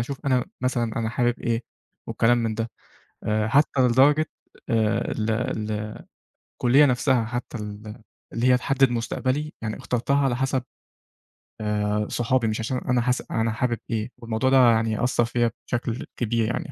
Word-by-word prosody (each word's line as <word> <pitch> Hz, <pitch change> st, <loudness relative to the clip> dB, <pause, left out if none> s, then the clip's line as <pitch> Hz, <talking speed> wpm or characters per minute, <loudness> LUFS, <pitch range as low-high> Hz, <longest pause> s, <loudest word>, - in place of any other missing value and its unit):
أشوف 135 Hz, +4 st, -5 dB
أنا 130 Hz, -2 st, +2 dB
مثلًا 120 Hz, -3 st, 0 dB
أنا 110 Hz, -, -1 dB
حابب 120 Hz, -1 st, 0 dB
إيه؟ 115 Hz, 0 st, -1 dB, 0.4 s
والكلام 120 Hz, +1 st, +2 dB
من 115 Hz, -1 st, -1 dB
ده. 115 Hz, +1 st, -3 dB, 0.5 s
آآ 105 Hz, 0 st, +1 dB
حتّى 140 Hz, +1 st, +3 dB
لدرجة 135 Hz, +5 st, +4 dB, 0.4 s
آآ 110 Hz, -1 st, +1 dB
ال 110 Hz, +1 st, -1 dB
ال 110 Hz, -2 st, -2 dB, 0.6 s
الكُلّية 135 Hz, +4 st, +5 dB
نفسها 125 Hz, -2 st, +2 dB
حتّى 120 Hz, +1 st, -5 dB
ال 105 Hz, +2 st, -8 dB, 0.3 s
اللي 115 Hz, +2 st, 0 dB
هي 125 Hz, -, +6 dB
تحدد 135 Hz, 0 st, +2 dB
مستقبلي. 130 Hz, +5 st, -2 dB
يعني 110 Hz, -1 st, -3 dB
اخترتها 125 Hz, +3 st, 0 dB
على 125 Hz, -3 st, +1 dB
حسب 130 Hz, 0 st, 0 dB, 1.0 s
آآ 105 Hz, 0 st, 0 dB
صحابي 120 Hz, 0 st, +1 dB
مش 110 Hz, +1 st, -1 dB
عشان 125 Hz, +3 st, -2 dB
أنا 125 Hz, 0 st, 0 dB
حاس 125 Hz, +1 st, 0 dB
أنا 115 Hz, 0 st, +1 dB
حابب 120 Hz, +1 st, -1 dB
إيه؟ 110 Hz, +1 st, -2 dB
والموضوع 115 Hz, +2 st, -1 dB
ده 135 Hz, -, +5 dB
يعني 110 Hz, 0 st, 0 dB
أثّر 120 Hz, -1 st, +2 dB
فيّا 120 Hz, 0 st, 0 dB, 0.2 s
بشكل 120 Hz, 0 st, -2 dB
كبير. 115 Hz, -1 st, 0 dB
يعني 115 Hz, +5 st, -3 dB
120 Hz, 160 wpm, -24 LUFS, 110-125 Hz, 1.0 s, هي